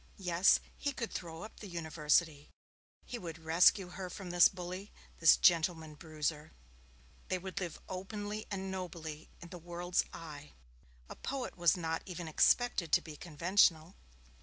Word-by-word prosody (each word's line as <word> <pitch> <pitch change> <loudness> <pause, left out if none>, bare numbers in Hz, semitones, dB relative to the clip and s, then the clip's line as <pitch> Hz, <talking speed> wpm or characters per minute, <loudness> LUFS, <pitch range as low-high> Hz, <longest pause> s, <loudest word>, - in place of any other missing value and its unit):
Yes, 180 -1 +4 0.2
he 285 -1 -2
could 230 -3 -4
throw 165 -1 -6
up 215 - -11
the 210 - -8
University. 160 -3 0 0.6
He 245 - -6
would 165 -4 -7
rescue 170 +3 +4
her 185 +1 -6
from 180 -1 -7
this 175 -1 +7
bully, 185 +2 -7 0.3
this 165 - +7
gentleman 160 -2 +3
bruiser. 155 0 -4 0.7
They 185 - 0
would 190 +1 -5
live 175 -4 -5
openly 205 +3 -5
and 190 -1 -4
nobly 165 -4 -6
in 170 - -10
the 180 0 -9
world's 175 +1 -1
eye. 150 -3 -10 0.5
A - - -9
poet 270 -2 -4
was 175 0 +3
not 165 -1 -2
even 175 -2 -6
expected 175 +1 +2
to - - +6
be 155 -2 -9
conventional. 170 +1 +2
175 Hz, 150 wpm, -33 LUFS, 160-190 Hz, 0.7 s, this